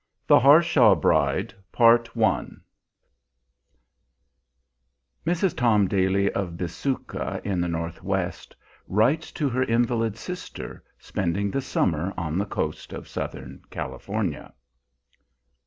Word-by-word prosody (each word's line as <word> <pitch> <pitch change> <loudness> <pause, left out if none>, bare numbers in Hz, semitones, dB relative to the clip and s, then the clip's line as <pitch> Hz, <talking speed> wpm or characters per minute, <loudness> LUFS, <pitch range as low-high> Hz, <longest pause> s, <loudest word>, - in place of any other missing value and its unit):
THE - - +6
HARSHAW 140 - +6
BRIDE 80 - +1 0.2
[Mrs. 115 -1 +3 2.9
Tom 110 -5 +3
Daly, 95 +1 +1
of 90 -4 -3
Bisuka 95 +11 -3
in 95 -3 -1
the 85 - 0
Northwest, 85 -1 -3 0.3
writes 125 - +1
to 150 - -1
her 130 +1 -1
invalid 115 -2 +1
sister 180 +8 -8
spending 100 +1 -2
the 135 - -1
summer 90 - -1
on 85 0 -2
the 100 - -1
coast - - -4
of - - -8
Southern 65 0 -6
California. 100 -7 -4
100 Hz, 95 wpm, -25 LUFS, 90-120 Hz, 2.9 s, THE